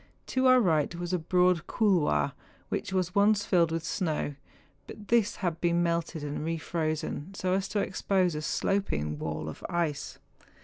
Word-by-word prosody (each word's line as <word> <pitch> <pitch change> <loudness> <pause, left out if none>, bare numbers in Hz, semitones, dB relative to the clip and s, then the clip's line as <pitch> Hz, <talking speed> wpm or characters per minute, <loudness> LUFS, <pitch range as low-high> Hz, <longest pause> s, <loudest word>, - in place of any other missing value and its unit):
To 260 0 +3
our 255 0 +7
right 165 - +2
was 175 +1 -4
a 180 - +2
broad 180 +1 +2
couloir, 165 - +2 0.4
which - - -3
was 185 -2 0
once 205 +1 +3
filled 170 -3 +3
mth 165 0 -2
snow, 160 -4 -1 0.5
but 210 -1 -11
this 225 -3 +3
had 165 -2 -1
been 175 0 +2
melted 170 -2 -1
and 145 0 -4
re 165 +1 -1
frozen, 155 +2 -3
so 185 -1 -1
as 195 0 0
to 210 - -1
expose 190 -2 +1
a 150 - -3
sloping 75 - -1
wall 80 0 -4
of 80 - -8
ice. 170 -5 -2
175 Hz, 170 wpm, -29 LUFS, 155-190 Hz, 0.5 s, our